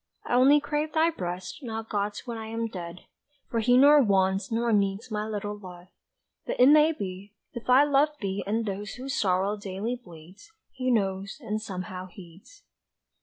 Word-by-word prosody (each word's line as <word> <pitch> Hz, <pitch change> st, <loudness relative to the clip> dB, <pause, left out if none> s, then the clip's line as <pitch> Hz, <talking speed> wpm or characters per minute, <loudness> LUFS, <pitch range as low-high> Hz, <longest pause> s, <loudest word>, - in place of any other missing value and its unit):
I -, -, -3 dB
only 265 Hz, +4 st, +6 dB
crave 300 Hz, +1 st, -2 dB
thy 325 Hz, +1 st, +3 dB
breast 180 Hz, -, -5 dB
Not 225 Hz, -3 st, -5 dB
God's 205 Hz, 0 st, -3 dB
when 240 Hz, -2 st, -5 dB
I 220 Hz, -1 st, -6 dB
am 225 Hz, +1 st, -3 dB
dead. 180 Hz, -5 st, -7 dB, 0.5 s
For 230 Hz, -, 0 dB
He 245 Hz, +3 st, +4 dB
nor 290 Hz, +2 st, +7 dB
wants 195 Hz, -2 st, +1 dB
nor 230 Hz, 0 st, +1 dB
needs 200 Hz, +3 st, 0 dB
My 210 Hz, 0 st, -2 dB
little 210 Hz, -1 st, -4 dB
love. 180 Hz, -3 st, -12 dB, 0.6 s
But -, -, -3 dB
it 250 Hz, +2 st, +7 dB
may 305 Hz, +1 st, +6 dB
be, 195 Hz, -, -7 dB, 0.2 s
if 235 Hz, 0 st, -8 dB
I 260 Hz, +3 st, +7 dB
love 290 Hz, +1 st, +3 dB
thee 195 Hz, -1 st, -3 dB
And 225 Hz, +2 st, 0 dB
those 200 Hz, 0 st, -4 dB
whose 265 Hz, +3 st, -5 dB
sorrow 195 Hz, +2 st, +1 dB
daily 205 Hz, +4 st, -4 dB
bleeds, 185 Hz, -, -15 dB, 0.2 s
He 255 Hz, -1 st, -3 dB
knows 195 Hz, -3 st, -1 dB
and 215 Hz, -5 st, -4 dB
somehow 185 Hz, -2 st, -6 dB
heeds!" 180 Hz, -, -15 dB
210 Hz, 175 wpm, -27 LUFS, 190-250 Hz, 0.6 s, nor